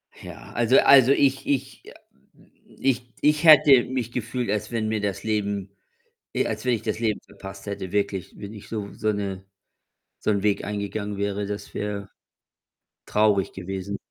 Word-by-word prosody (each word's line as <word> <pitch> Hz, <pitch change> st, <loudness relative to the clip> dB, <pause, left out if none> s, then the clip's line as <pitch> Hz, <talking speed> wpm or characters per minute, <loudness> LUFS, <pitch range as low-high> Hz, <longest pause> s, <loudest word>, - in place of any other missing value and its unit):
Ja, -, -, -11 dB
also 120 Hz, +2 st, +3 dB
also, 135 Hz, -2 st, +7 dB
ich 135 Hz, -1 st, +2 dB
ich 140 Hz, -3 st, -2 dB
a -, -, -18 dB, 0.8 s
ich 125 Hz, -2 st, 0 dB
ich 150 Hz, +1 st, +3 dB
hätte 145 Hz, -5 st, +8 dB
mich 125 Hz, -3 st, -3 dB
gefühlt, 120 Hz, 0 st, -3 dB
als 105 Hz, +3 st, -2 dB
wenn 115 Hz, -2 st, -1 dB
mir 110 Hz, -1 st, -1 dB
das 100 Hz, -3 st, -3 dB
Leben 100 Hz, -3 st, -2 dB, 0.6 s
e -, -, +1 dB
als -, -, -4 dB
wenn 125 Hz, -, +3 dB
ich 115 Hz, -, -1 dB
das 110 Hz, 0 st, -2 dB
Leben 110 Hz, -3 st, 0 dB
verpasst 95 Hz, 0 st, -11 dB
hätte, 100 Hz, -3 st, -5 dB
wirklich, 100 Hz, -2 st, -2 dB
wenn 100 Hz, +1 st, -8 dB
ich 105 Hz, -, -12 dB
so 105 Hz, -3 st, -4 dB
so 110 Hz, -, -1 dB
'ne 100 Hz, -2 st, -4 dB, 0.8 s
so -, -, -1 dB
'n 100 Hz, -2 st, +1 dB
Weg 105 Hz, -1 st, +1 dB
eingegangen 105 Hz, 0 st, -4 dB
wäre, 100 Hz, 0 st, -2 dB
das 105 Hz, 0 st, -6 dB
wäre 100 Hz, -1 st, -4 dB, 1.0 s
traurig 105 Hz, -2 st, +2 dB
gewesen. 95 Hz, +1 st, -5 dB
105 Hz, 165 wpm, -24 LUFS, 100-120 Hz, 1.0 s, hätte